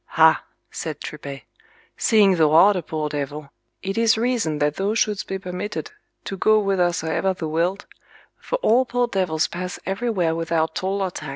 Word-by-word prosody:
Ha, 160 0 +6 0.3
said 155 -2 -5
Tripet, 140 -2 -7 0.5
seeing 205 -5 +4
thou 155 -2 +3
art 195 +6 +7
a 180 - -1
poor 155 -1 -3
devil, 145 0 -5 0.3
it 195 +3 -2
is 225 -1 +4
reason 225 -10 0
that 150 0 0
thou 200 +3 0
shouldst 210 -2 0
be 195 - -3
permitted 190 - -5 0.3
to 195 - -5
go 215 +3 +4
whithersoever 180 -2 0
thou 165 -3 -4
wilt, 170 +5 -1 0.5
for - - -3
all 245 +4 +4
poor 245 -1 0
devils 180 -7 0
pass 180 +1 -5
everywhere 195 -4 0
without 165 -1 -1
toll 195 +1 -1
or 185 - -2
tax. - - -7
185 Hz, 170 wpm, -22 LUFS, 160-205 Hz, 0.5 s, art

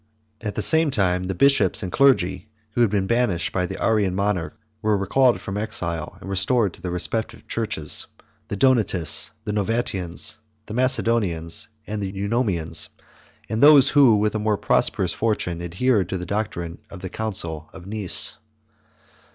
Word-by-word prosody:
At 105 -2 -4
the - - -1
same 160 -1 +5
time 90 -7 +1
the 95 0 -3
bishops 110 -4 +3
and 90 - -4
clergy, 115 -6 +2 0.2
who 120 - -1
had 115 - +4
been 100 -1 0
banished 105 -5 0
by 90 -1 -1
the - - -7
Arian 105 -5 +1
monarch, 100 -3 -2 0.2
were 110 -1 +1
recalled 120 +2 +2
from 100 +1 -6
exile, 85 -6 -2
and 100 - -11
restored 100 +2 +1
to - - -16
their 90 - -4
respective 110 +6 -3
churches; 90 -10 -1 0.4
the - - -4
Donatists, 100 - +2
the 105 -2 -4
Novatians, 100 -4 -1 0.3
the - - -8
Macedonians, 115 -10 +1 0.2
the 105 -2 -4
Eunomians, 95 -5 0 0.6
and 110 +2 -3
those 145 -2 +7
who, 135 -6 +5
with 105 0 0
a 110 - -2
more 105 -1 0
prosperous 90 -2 +1
fortune, 95 -6 -2
adhered 95 +3 0
to 95 - -2
the 90 - -6
doctrine 90 -4 -4
of 95 - -11
the 95 - -6
Council 85 -8 -3
of 90 -2 -12
Nice. 100 -2 +1
100 Hz, 160 wpm, -22 LUFS, 90-115 Hz, 0.6 s, those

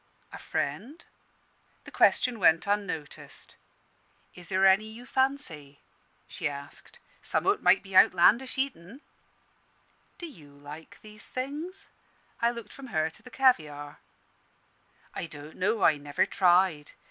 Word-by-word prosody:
"A - - -8
friend?" 230 - -4 0.8
The - - -12
question 245 -3 +3
went 165 -3 +4
unnoticed. 200 -7 -4 0.8
"Is 180 -1 -13
there 190 0 +2
any 195 +2 +5
you 225 +3 -11
fancy?" 215 - -2 0.5
she - - -3
asked. 140 0 -11 0.2
"Some - - -1
o't 405 +2 +2
may - - +6
be 195 -1 -11
outlandish 215 +10 +5
eatin'." 260 - -3 1.2
"Do 345 - -7
you 155 - -13
like 150 +3 -11
these 215 0 -8
things?" 300 +9 -5 0.5
I 235 - +4
looked 235 -3 -8
from 275 -1 -10
her 160 -7 -1
to 215 - -15
the 255 - -13
caviare. 155 - +1 1.1
"I - - -5
don't 150 0 -11
know. 205 +3 0
I 155 - +5
never 145 0 0
tried. 180 -5 +2
195 Hz, 130 wpm, -28 LUFS, 155-250 Hz, 1.2 s, may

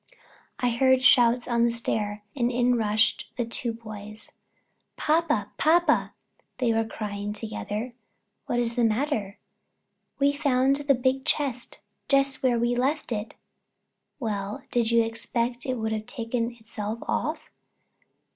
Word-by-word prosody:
I 245 -1 +1
heard 260 +2 +3
shouts 245 -1 +5
on 235 -1 +2
the 235 - +4
stair, 210 -3 -1
and 245 -2 +1
in 245 0 +2
rushed 215 -1 +1
the 240 - 0
two 235 +1 -2
boys. 215 -1 -9 0.7
"Papa, 305 -7 +1
papa!" 340 +3 +3 0.4
they 240 -3 +2
were 225 0 +1
crying 205 -1 -4
together. 215 +2 -4 0.5
"What 240 - 0
is 235 -1 +1
the 240 0 +1
matter?" 225 -3 0 0.8
"We've 285 +1 +2
found 270 -1 +3
the 285 -1 +2
big 260 +2 0
chest 260 -5 -1 0.3
just 275 -1 +3
where 250 -2 +2
we 240 +1 +1
left 270 +3 0
it." 215 -1 -3 0.8
"Well, 210 +1 -3
did 235 -3 +2
you 235 0 +4
expect 235 +2 -1
it 255 - 0
would 220 -1 -2
have 215 0 -3
taken 235 0 -3
itself 220 -1 -5
off?" - - -2
235 Hz, 135 wpm, -26 LUFS, 220-260 Hz, 0.8 s, shouts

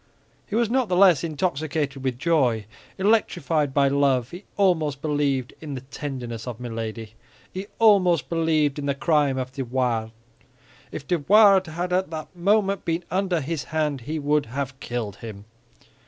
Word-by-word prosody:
He 205 - -4
was 235 0 +2
not 250 0 0
the 180 - +1
less 180 -6 +5
intoxicated 155 -4 -2
with 130 -2 -1
joy, 130 -8 +1 0.3
electrified 175 -8 +1
by 140 0 +3
love. 135 -3 +1
He 180 +4 -10
almost 160 -8 +2
believed 145 -4 -1
in 150 -3 -6
the 130 - -6
tenderness 130 -4 -6
of 120 -2 -6
Milady; 115 -2 -6 0.4
he 190 +2 -5
almost 195 -7 +4
believed 155 -3 +1
in 140 - -4
the 140 - 0
crime 150 -3 +2
of 130 0 -3
De 135 0 -4
Wardes. 120 -3 -1 0.8
If 140 - -7
De 175 -2 +1
Wardes 195 0 +5
had 180 +1 -2
at 185 -1 +1
that 160 +2 -7
moment 195 +2 +1
been 170 +1 -1
under 185 -3 0
his 150 +1 -4
hand, 150 -4 -1
he 150 +7 -4
would 150 -2 +1
have 135 +2 -5
killed 115 -6 -4
him. 105 -3 -9
150 Hz, 165 wpm, -24 LUFS, 130-175 Hz, 0.8 s, less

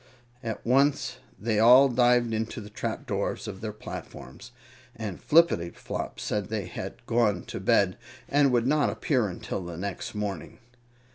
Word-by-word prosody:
At 115 -3 -5
once 135 +4 +2 0.2
the 105 - -16
they 110 -3 +2
all 125 +5 +8
dived 120 -2 +3
into 110 +1 -2
the 105 0 -10
trapdoors - - -3
of 95 - -7
their 110 -1 -3
platforms, 105 - -9 0.4
and 105 -5 -6
Flippityflop 150 - +1
said 105 -3 -2
they 105 -3 -2
had - - -7
gone 110 -6 +1
to - - -6
bed 95 -2 +2 0.3
and 140 -1 +3
would 120 -1 +2
not 150 +2 +3
appear 125 -7 0
until 95 +1 -5
the 85 -1 -7
next 100 +3 -5
morning. 105 -2 -4
110 Hz, 150 wpm, -27 LUFS, 100-125 Hz, 0.4 s, all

